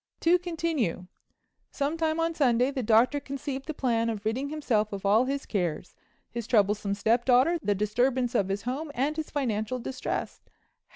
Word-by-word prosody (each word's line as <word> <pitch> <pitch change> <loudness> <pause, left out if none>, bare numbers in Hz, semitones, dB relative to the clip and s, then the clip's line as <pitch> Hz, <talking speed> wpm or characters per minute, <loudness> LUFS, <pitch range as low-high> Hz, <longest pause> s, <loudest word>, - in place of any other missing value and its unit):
To 350 +2 +4
continue: 325 - -2 0.6
Sometime 315 +2 -1
on 330 0 +1
Sunday 255 -3 +2
the 270 -2 -2
Doctor 235 +5 +3
conceived 275 0 -5
the 315 - -3
plan 230 -4 +1
of 215 -2 -4
ridding 255 +6 -1
himself 235 -8 0
of 200 -1 -6
all 215 +5 +4
his 275 +1 -3
cares—his 185 +5 -5
troublesome 205 -3 +2
stepdaughter, 245 +9 +3
the 205 -6 +1
disturbance 245 +5 +1
of 200 -5 +1
his 195 +1 -2
home 280 +6 -3
and 280 +5 0
his 315 -1 -4
financial 240 -4 -1
distress. 255 +1 -4
250 Hz, 155 wpm, -28 LUFS, 215-290 Hz, 0.6 s, To